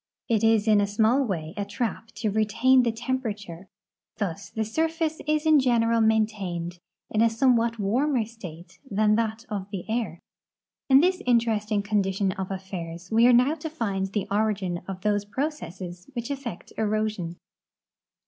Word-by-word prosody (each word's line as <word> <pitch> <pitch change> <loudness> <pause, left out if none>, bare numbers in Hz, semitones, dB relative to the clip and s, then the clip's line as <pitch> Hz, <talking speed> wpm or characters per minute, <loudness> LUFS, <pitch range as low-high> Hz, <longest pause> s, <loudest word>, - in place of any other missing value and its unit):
It 225 -2 +1
is 225 -1 +4
in 210 -2 +5
a 200 - +1
small 220 +6 +3
way 165 -8 -3
a 205 - -2
trap 220 +2 -3
serving 215 - -1
to - - -8
retain 255 +5 +4
the 240 -2 +1
tem 245 +3 -2
])erature. 200 -6 -6 0.5
Thus 200 -2 -3
the 220 -1 -2
surface 320 +6 -1
is 305 +1 +1
in 310 -2 +6
general 230 -3 +3
maintained 200 -6 0 0.3
in 215 - +2
a 230 - +5
some 245 +3 +3
what 230 0 0
warmer 240 +4 +1
state 185 -6 -11
than 210 0 +3
that 225 +1 -2
of 200 -2 -4
the 195 -2 -6
air. 220 -7 -2 0.7
In 270 +1 +7
this 365 +2 +2
interesting 220 -3 +2
condition 195 -2 +1
of 190 0 -5
affairs 180 -3 -6
we 230 +2 +6
are - - +7
now 250 +5 +5
to 320 0 -5
find 200 -10 -2
the 200 0 -2
origin 200 -4 0
of 190 -1 -6
those 205 0 +1
j)ro 265 +9 -1
cesses 180 - -9
which 235 +3 -3
effect 260 -9 -6
erosion. 215 -5 -1
215 Hz, 170 wpm, -26 LUFS, 195-235 Hz, 0.7 s, In